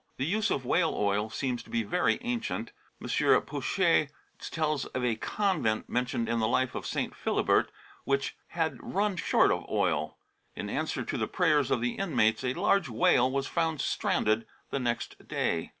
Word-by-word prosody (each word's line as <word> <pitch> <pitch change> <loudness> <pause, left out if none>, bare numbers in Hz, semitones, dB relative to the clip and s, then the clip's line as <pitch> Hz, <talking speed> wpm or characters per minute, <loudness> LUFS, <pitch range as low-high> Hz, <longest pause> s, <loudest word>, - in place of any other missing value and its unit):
The 130 - -1
use 215 +7 +1
of 130 - -1
whale 165 +5 +2
oil 105 +1 +1
seems 125 0 -2
to - - -17
be 115 - 0
very 180 +12 +1
ancient. 240 -1 -3 0.3
M. - - -7 0.4
Pouchet* 165 -6 +1 0.3
tells 155 -3 -1
of 130 -1 -3
a 115 -2 +1
convent 155 - 0
mentioned 125 -1 -1
in 115 0 0
the 110 - +2
life 130 +2 +1
of - - -5
St. - - -2
Philibert - - +2 0.3
which 140 0 0
had 160 -7 -2
run 205 0 0
short - - +3
of - - -2
oil. 75 +1 0 0.4
In - - -5
answer - - -2
to - - -3
the - - 0
prayers 145 -3 +2
of 120 - +1
the 125 0 -2
inmates 130 - +2
a 125 0 -1
large 195 -3 +2
whale 120 +2 +3
was 135 0 -1
found 160 -1 -1
stranded 110 -2 0 0.2
the 140 - -1
next 120 -2 -3
day. 80 -1 -1
135 Hz, 175 wpm, -29 LUFS, 115-165 Hz, 0.4 s, short